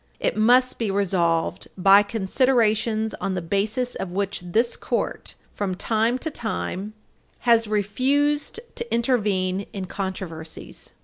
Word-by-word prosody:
It - - 0
must 250 +4 +4
be 225 -3 0
resolved 175 -4 0
by 195 +2 +7
considerations 220 +1 +1
on 190 - -1
the - - 0
basis 215 +8 -1
of 185 - -5
which 195 0 -2
this 225 +7 +1
Court, - - -3 0.2
from 195 -3 -2
time 225 +5 +1
to 320 +5 -4
time, 215 -4 -4 0.5
has 230 -2 +4
refused 270 - +1 0.2
to 470 0 -4
intervene 200 -6 +1
in 195 -2 -4
controversies. 185 -4 -6
210 Hz, 125 wpm, -24 LUFS, 190-235 Hz, 0.5 s, by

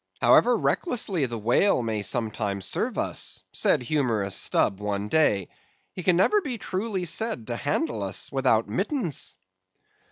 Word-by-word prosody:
"However - - +5
recklessly 195 - 0
the 120 -1 -5
whale 120 - +2
may 110 -2 -2
sometimes 105 -3 -2
serve - - -1
us," - - -2
said - - +2
humorous 115 -8 0
Stubb 95 - +1
one 105 0 -3
day, 105 - +2 0.4
"he 185 - -6
can 180 0 +3
never 415 - +3
be 260 -9 -4
truly 195 -2 -3
said 170 - -2
to 120 - -3
handle 140 -3 -2
us 95 -1 -1
without 130 -5 +2
mittens." 180 - -2
125 Hz, 140 wpm, -25 LUFS, -, 0.4 s, However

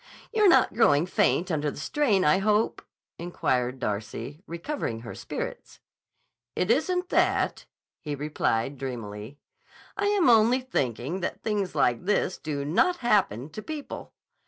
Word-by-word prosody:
"You're 425 -3 +5
not - - +4
growing 160 -9 +4
faint 180 0 +1
under 150 -2 0
the - - -8
strain, 215 - +1
I 150 +5 +4
hope?" 210 +2 +1 0.4
inquired 130 -7 -1
Darcy, 115 +6 -4
recovering 170 - -4
her 115 - -8
spirits. - - -6 0.8
"It 180 +4 +1
isn't 360 +7 +1
that," - - +1 0.3
he 150 -3 -4
replied 140 -3 -1
dreamily. 115 -1 -6 0.6
"I 405 0 0
am 405 -6 +3
only 235 +2 +5
thinking 140 - -2
that 185 - -4
things 205 -4 -1
like 120 +7 +1
this 195 -2 0
do 145 -2 -3
not 350 - +2
happen 155 - +1
to 215 - -7
people. 305 +3 -7
170 Hz, 135 wpm, -27 LUFS, -, 0.8 s, You're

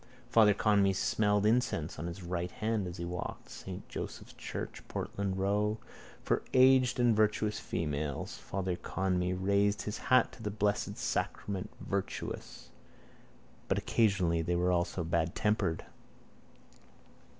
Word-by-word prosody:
Father 105 -3 +6
Conmee 100 -2 +3
smelt 105 +1 +2
incense 105 -8 +1
on 85 - -3
his 85 +2 -7
right 90 0 -2
hand 110 0 -1
as 90 +1 -6
he 85 - -4
walked. 90 +1 -5
Saint 95 -1 -8
Joseph's - - -6
church, - - -6
Portland 100 -2 -3
row. 105 +3 +1 0.5
For - - +1
aged 130 -1 +6
and 120 -2 +4
virtuous 105 0 +2
females. 75 -3 -3
Father 95 -2 -3
Conmee 90 0 -1
raised 100 +2 +2
his 105 - -4
hat 130 0 +5
to 125 - -13
the 105 - -2
Blessed 105 0 0
Sacrament. 95 -3 -2
Virtuous: 95 -8 -4 1.0
but - - +1
occasionally 95 -7 +2
they 85 +2 0
were 90 +1 +2
also 85 0 0
badtempered. 85 +2 0
100 Hz, 130 wpm, -32 LUFS, 90-105 Hz, 1.0 s, Father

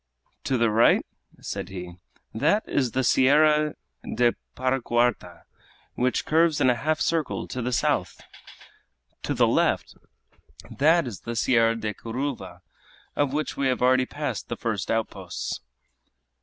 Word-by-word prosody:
"To 130 - +1
the 115 -2 +2
right," 115 +2 +4 0.4
said - - -5
he, 90 -2 -8 0.4
"that 155 - +1
is 130 -5 0
the 130 - +1
Sierra 150 +4 +4 0.3
de 120 -1 +1 0.2
Paracuarta, 120 -7 0 0.5
which 125 -1 0
curves 160 -1 +3
in 130 - +4
a - - 0
half 155 +6 -1
circle 165 -3 -1
to 125 - -4
the 125 +2 -2
south! 120 - 0 1.0
To - - -2
the - - +4
left, - - +1 0.8
that 160 +3 +3
is 115 -7 -6
the 115 - -6
Sierra 115 -1 +3
de 110 -2 -3
Curuva, 115 -8 -5 0.5
of 145 -2 +1
which 150 +2 -2
we 140 - 0
have 130 -1 0
already 130 0 +4
passed - - -4
the - - -4
first - - -3
outposts." 95 -6 -3
125 Hz, 140 wpm, -25 LUFS, 115-145 Hz, 1.0 s, right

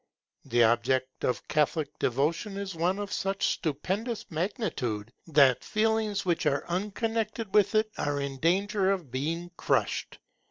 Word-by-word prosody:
The 120 0 +3
object 130 +3 +1
of 120 -5 -1
Catholic 150 0 0
devotion 160 - 0
is 200 -1 -4
one 175 +4 0
of 205 -1 -4
such 195 0 0
stupendous 200 - -2
magnitude, 155 - -2
that 140 -5 +5
feelings 215 -2 0
which 170 -3 +1
are 140 -1 +1
unconnected 215 +3 -2
with 205 0 +4
it 215 0 +2
are 145 0 0
in 140 -1 -3
danger 195 +5 +2
of 180 -9 -1
being 165 +7 -2
crushed. - - 0
175 Hz, 135 wpm, -28 LUFS, 140-205 Hz, -, that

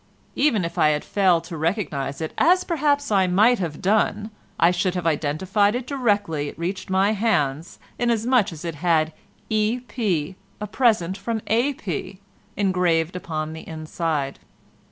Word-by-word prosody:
Even 225 - +2
if 170 - -5
I 155 - +5
had 150 0 -1
failed 185 -5 +2
to 170 0 -8
recognise 155 -5 -2
it, 160 - -4
as 365 +3 +4
perhaps 285 -5 0
I 190 -2 +3
might 215 +7 +4
have 165 -2 -4
done, 210 +2 +1 0.3
I 170 - +5
should 180 +1 0
have 180 -2 -3
identified 180 +7 +1
it 250 0 -3
directly 205 - 0
it - - -12
reached 185 +4 -4
my 190 +2 +3
hands, 165 -8 0 0.2
inasmuch 235 -2 +2
as 165 +1 -9
it 165 - -3
had 160 0 +1 0.4
'E. 215 +3 +1
P., 190 - -2 0.2
a 210 - -3
present 210 -5 +1
from 230 -1 -2
A. 240 +7 +1
P.' 185 -1 -5 0.4
engraved 180 -4 +1
upon 155 -3 -4
the 160 - -10
inside. 155 -3 -3
185 Hz, 155 wpm, -23 LUFS, 160-220 Hz, 0.4 s, I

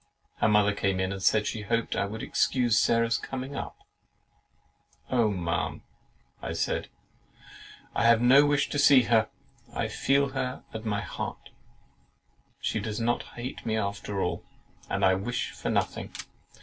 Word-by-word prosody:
Her - - +2
mother 105 -1 +4
came 100 -2 0
in 95 0 0
and 100 -1 -5
said, 105 +2 +3
she 110 - -3
hoped 115 +2 -1
I 100 +1 0
should 110 +2 -6
excuse 120 -4 +2
Sarah's 115 0 +2
coming 135 +1 -6
up. - - -5 1.3
"Oh, 120 -4 +3
Ma'am," 85 -4 -2 0.6
I - - -4
said, - - -1 1.1
"I - - +1
have 115 -1 +6
no 130 +4 +7
wish 145 -1 +2
to 145 - -1
see 140 -3 +7
her; 115 -2 +3 0.4
I - - -2
feel 140 +1 +2
her 130 -1 -3
at 110 0 -6
my 105 -1 0
heart; - - -6 1.1
she - - -1
does 110 0 -4
not 120 +1 +1 0.2
hate 125 +3 -6
me 110 -1 -1
after 100 -1 -3
all, 90 - -2 0.5
and 100 0 +1
I 95 - +5
wish 100 +6 -2
for - - -5
nothing. - - -1
110 Hz, 155 wpm, -28 LUFS, 100-125 Hz, 1.3 s, no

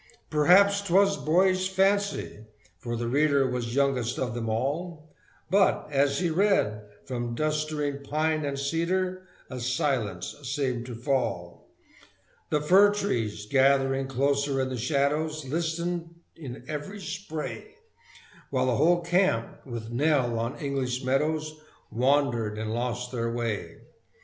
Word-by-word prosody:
Perhaps 195 +7 +5
'twas 200 +1 +3
boyish 185 +3 +2
fancy, 195 - 0 0.3
for 120 +5 -4
the 120 0 -2
reader 140 +1 +3
Was 125 -1 -3
youngest 130 -4 +1
of 125 -4 -2
them 115 -1 -3
all, 150 +7 -3 0.4
But, 195 0 +3
as 140 0 +2
he 175 -2 0
read, 165 - +2 0.2
from 120 -2 -3
clustering 150 -1 -1
pine 155 +2 0
and 140 -1 -2
cedar 185 +6 -1 0.2
A 130 - -5
silence 120 -7 -1
seemed 130 -3 -2
to 120 - -6
fall; 115 -9 -2 0.8
The 150 - +1
fir 195 +7 +6
trees, 115 - -2
gathering 135 +1 +3
closer 140 +1 0
in 130 0 0
the 130 - -3
shadows, 150 +3 0
Listened 170 +3 -2 0.3
in 135 -6 -8
every 155 +7 -5
spray, 195 - -6 0.7
While 130 -2 +1
the 125 -2 +1
whole 175 +4 +4
camp, 170 -10 0
with 115 -2 -6
"Nell" 125 -3 +1
on 115 +3 -3
English 135 -3 -2
meadows, 155 +3 -1 0.3
Wandered 120 -3 +1
and 110 0 -3
lost 125 +1 -3
their 115 -2 -2
way. 115 -3 -4
140 Hz, 130 wpm, -27 LUFS, 125-160 Hz, 0.8 s, fir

